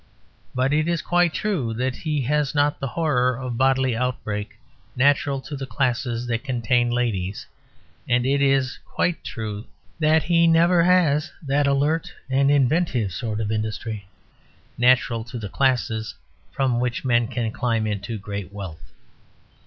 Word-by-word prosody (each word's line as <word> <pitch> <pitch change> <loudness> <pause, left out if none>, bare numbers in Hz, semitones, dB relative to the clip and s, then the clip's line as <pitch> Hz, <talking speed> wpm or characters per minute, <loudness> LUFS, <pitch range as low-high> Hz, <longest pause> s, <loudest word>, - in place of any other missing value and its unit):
But 130 +3 +1
it 155 +1 +2
is 170 -1 0
quite 175 -1 +2
true 155 - -2
that 130 +2 -1
he 150 -3 -1
has 150 +2 0
not 145 0 +2
the 135 - -2
horror 130 -5 +1
of 125 -2 -4
bodily 130 0 +2
outbreak, 110 -4 -3 0.4
natural 140 +1 +2
to 145 - -7
the 135 -1 -5
classes 120 -2 -1
that 115 0 -2
contain 120 -2 +1
ladies; 110 -6 -2 0.6
and 125 0 +2
it 140 +1 +2
is 135 -1 +2
quite 175 - -1
true 110 -1 -5 0.3
that 155 0 +3
he 170 0 +3
never 170 +1 +5
has 175 -4 +3
that 140 +1 +2
alert 145 +4 +1 0.2
and 135 +1 +3
inventive 140 - +2
sort 110 +4 -3
of 110 -1 -2
industry 110 -1 -3 0.7
natural 120 -2 +3
to 120 +1 -7
the 105 -3 -5
classes 120 -4 0 0.4
from 130 -3 0
which 125 +1 -2
men 120 -2 +3
can 120 -3 -2
climb 115 -2 0
into 105 +1 -3
great 100 -2 -6
wealth. 85 -6 -9
125 Hz, 150 wpm, -23 LUFS, 115-145 Hz, 0.7 s, never